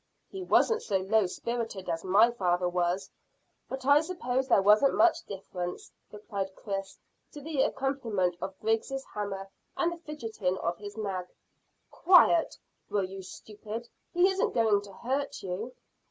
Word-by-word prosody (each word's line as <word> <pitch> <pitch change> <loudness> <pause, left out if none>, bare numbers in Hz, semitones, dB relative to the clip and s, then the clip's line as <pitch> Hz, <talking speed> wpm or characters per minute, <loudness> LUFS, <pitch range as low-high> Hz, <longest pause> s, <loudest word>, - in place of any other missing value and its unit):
"He 385 - -6
wasn't 450 +4 +3
so 200 - 0
low 195 +2 +2
spirited 225 -1 -4
as 165 -1 -2
my 205 +6 +5
father 180 -5 +1
was; 175 +1 -1 0.6
but 265 0 -5
I 285 +2 +6
s'pose 265 -7 -2
there 240 - +5
wasn't 210 +7 +5
much 345 0 +4
difference," 180 -2 -6 0.2
replied 200 -2 -5
Chris, 195 -2 -5 0.4
to 295 - -8
the 295 -1 -1
accompaniment 230 -12 0
of 190 0 -5
Griggs' 225 +5 0
hammer 195 -2 -4 0.3
and 345 - +2
the 345 - -6
fidgeting 225 - -3
of 170 -1 -2
his 205 +1 -8
nag. 190 -4 -3 0.6
"Quiet, 345 -2 +5 0.3
will 205 -2 +1
you, 190 +1 -6
stupid! 215 +4 -8 0.2
He 355 +2 +4
isn't 385 0 0
going 220 -4 +3
to 200 -1 -12
hurt 270 +7 -3
you." 195 +6 -4
215 Hz, 150 wpm, -29 LUFS, 190-270 Hz, 0.6 s, I